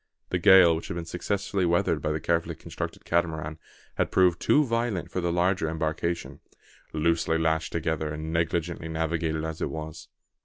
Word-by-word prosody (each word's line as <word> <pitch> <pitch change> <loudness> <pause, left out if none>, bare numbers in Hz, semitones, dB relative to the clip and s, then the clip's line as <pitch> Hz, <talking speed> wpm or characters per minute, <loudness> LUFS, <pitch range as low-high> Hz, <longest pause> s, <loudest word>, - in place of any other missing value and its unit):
The 90 - +1
gale, 90 -2 +7
which 80 - -5
had - - -4
been 85 -1 -4
successfully 95 +3 -2
weathered 85 0 +2
by 75 - -1
the 75 - -1
carefully 85 0 0
constructed - - -6
Catamaran, 80 -2 -1 0.4
had - - +1
proved 90 -2 +3
too 150 +1 +4
violent 115 -6 -1
for 90 - -2
the 85 0 0
larger 90 -1 +1
embarkation, 80 +1 -2 0.5
loosely 80 +1 +1
lashed 80 0 0
together, 80 -2 -1
and 80 +1 -5
negligently 85 0 -1
navigated 80 -1 -1
as 80 0 -5
it - - 0
was. 80 -1 -7
85 Hz, 165 wpm, -27 LUFS, 80-85 Hz, 0.5 s, gale